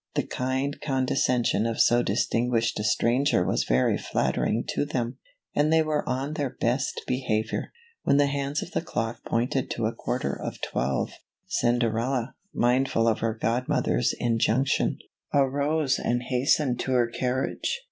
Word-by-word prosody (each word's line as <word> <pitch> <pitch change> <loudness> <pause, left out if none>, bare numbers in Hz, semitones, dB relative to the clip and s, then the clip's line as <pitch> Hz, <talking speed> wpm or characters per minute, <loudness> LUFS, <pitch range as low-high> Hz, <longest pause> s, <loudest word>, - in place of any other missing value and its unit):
The - - +1
kind 130 +2 -2
condescension 130 -4 +1
of 115 - -3
so 120 0 +5
distin 115 +3 0
guished 115 -2 +1
a - - -2
stranger 120 -2 +2
was - - +1
very 65 +1 +2
flattering 115 - 0
to - - 0
them, 125 -4 -3 0.3
and 150 +2 +2
they 160 0 +5
were 155 -1 0
on 135 +4 -2
their 145 -3 -1
best 125 +4 0
behavior. 115 -4 -1 0.3
When 140 - +3
the 145 - +5
hands 140 +1 -1
of 175 - -10
the - - -1
clock 115 -8 -3
pointed 125 +3 0
to 115 - -2
a 110 - 0
quarter 120 - -2
of - - -5
twelve, 65 +1 -1 0.3
Cinderella, 120 +1 0 0.2
mindful 120 -1 +2
of 110 - +2
her 115 -1 -1
godmother's 115 - 0
injunction, 120 +3 +1 0.4
arose 140 +1 +2
and 120 +1 0
hastened 125 +1 +1
to 130 - -1
her 125 -2 +4
carriage. 130 - -2
125 Hz, 150 wpm, -26 LUFS, 115-140 Hz, 0.4 s, so